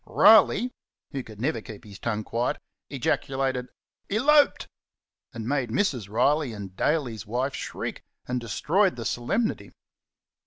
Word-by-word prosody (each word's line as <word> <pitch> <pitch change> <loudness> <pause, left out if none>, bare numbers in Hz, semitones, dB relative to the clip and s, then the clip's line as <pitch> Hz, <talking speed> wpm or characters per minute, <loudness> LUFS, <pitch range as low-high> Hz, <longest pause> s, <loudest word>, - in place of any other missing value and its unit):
Riley, 220 +2 +6 0.4
who 135 - -3
could 110 -4 -12
never 150 +7 -1
keep 110 -4 -10
his 100 -3 -12
tongue 110 -1 -2
quiet, 115 +3 -1 0.3
ejaculated, 130 -1 -1 0.4
"Elorped!" 285 +8 +4 0.6
and 115 -4 -6
made 135 -3 0
Mrs. 125 - 0
Riley 130 +4 +2
and 100 -3 -8
Daley's 120 -9 -1
wife 125 +5 -1
shriek, - - -5 0.2
and 125 0 -2
destroyed 180 - +1
the 115 - -6
solemnity. 200 - -1
125 Hz, 125 wpm, -26 LUFS, 115-155 Hz, 0.6 s, Riley